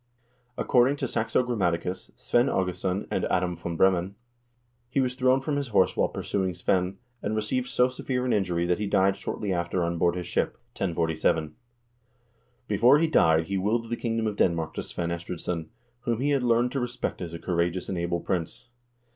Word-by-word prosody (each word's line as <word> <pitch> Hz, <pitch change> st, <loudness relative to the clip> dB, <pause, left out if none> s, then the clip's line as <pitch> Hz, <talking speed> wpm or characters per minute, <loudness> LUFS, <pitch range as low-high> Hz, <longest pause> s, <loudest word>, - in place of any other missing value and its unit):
Accord 125 Hz, +1 st, +4 dB
ing 140 Hz, -, 0 dB
to 135 Hz, -, -2 dB
Saxo 115 Hz, +2 st, +1 dB
Grammaticus, 90 Hz, -6 st, -1 dB
Svein 120 Hz, +2 st, +2 dB
Aagesson, 90 Hz, +1 st, -1 dB
and -, -, 0 dB
Adam 90 Hz, -1 st, 0 dB
v. 85 Hz, 0 st, -5 dB
Bremen, 95 Hz, +2 st, +2 dB, 0.7 s
he 135 Hz, -, 0 dB
was 130 Hz, -1 st, +1 dB
thrown 130 Hz, +1 st, +3 dB
from 145 Hz, +1 st, -1 dB
his 140 Hz, -1 st, -2 dB
horse 100 Hz, -5 st, +3 dB
while -, -, +2 dB
pursuing 95 Hz, -3 st, -2 dB
Svein, 90 Hz, +2 st, 0 dB, 0.2 s
and 105 Hz, +1 st, -2 dB
received 115 Hz, +4 st, -1 dB
so 125 Hz, -, +3 dB
severe 125 Hz, 0 st, -3 dB
an 125 Hz, -, +1 dB
injury 90 Hz, -4 st, +1 dB
that 90 Hz, +1 st, +1 dB
he 105 Hz, -, -1 dB
died 95 Hz, -1 st, +3 dB
shortly 100 Hz, 0 st, -3 dB
after 85 Hz, 0 st, -1 dB
on 85 Hz, 0 st, -1 dB
board 85 Hz, +1 st, +3 dB
his 90 Hz, -1 st, -4 dB
ship, 90 Hz, -, 0 dB, 0.2 s
1047. 80 Hz, -3 st, 0 dB, 1.1 s
Before 120 Hz, +6 st, +5 dB
he 165 Hz, -, +3 dB
died 80 Hz, -, +4 dB
he 95 Hz, +3 st, -1 dB
willed 115 Hz, +4 st, 0 dB
the -, -, +1 dB
kingdom 115 Hz, -1 st, -1 dB
of 105 Hz, -2 st, -2 dB
Denmark 80 Hz, -3 st, +1 dB
to -, -, -3 dB
Svein 85 Hz, -1 st, -4 dB
Estridsson, 85 Hz, -1 st, -4 dB, 0.3 s
whom 120 Hz, -2 st, -1 dB
he 145 Hz, +3 st, +1 dB
had 140 Hz, -2 st, +2 dB
learned 120 Hz, 0 st, +2 dB
to 135 Hz, -, -1 dB
respect 125 Hz, -3 st, -3 dB
as 85 Hz, -2 st, -5 dB
a -, -, -4 dB
courageous 85 Hz, +1 st, -1 dB
and 95 Hz, -, -3 dB
able 85 Hz, 0 st, -1 dB
prince. 95 Hz, +7 st, -3 dB
95 Hz, 190 wpm, -27 LUFS, 85-120 Hz, 1.1 s, Before